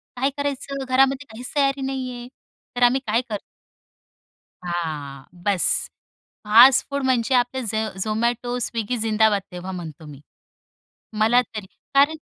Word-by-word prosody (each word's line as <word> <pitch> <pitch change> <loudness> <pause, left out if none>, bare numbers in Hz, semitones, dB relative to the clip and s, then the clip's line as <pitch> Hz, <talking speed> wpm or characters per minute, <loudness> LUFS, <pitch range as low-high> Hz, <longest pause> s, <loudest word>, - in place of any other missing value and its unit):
काय 260 +2 +1
करायचं? 275 -1 -3
घरामध्ये 270 +2 +2
काहीच 245 +4 -7
तयारी 275 -1 +1
नाही 265 -1 -3
आहे." 240 0 -8 0.5
तर 245 - +1
आम्ही 245 +2 +4
काय 225 +3 +2
करतो. 210 -2 -3 1.2
हां, 155 -6 -4 0.2
बस 200 -3 +2 0.8
फास्ट 240 +5 +7
फूड 280 -1 -2
म्हणजे 255 -1 +1
आपले 250 +1 +1
झ 220 0 -1 0.2
झोमॅटो, 235 +3 -1
स्विगी 230 0 -2
जिंदाबाद 220 -2 +2
तेव्हा 180 +1 -7
म्हणतो 165 -4 -8
मी. 145 -2 -11 1.0
मला 225 +3 +4
तरी 215 -4 -8 0.3
कारण, 285 +3 +4
240 Hz, 130 wpm, -22 LUFS, 210-260 Hz, 1.2 s, फास्ट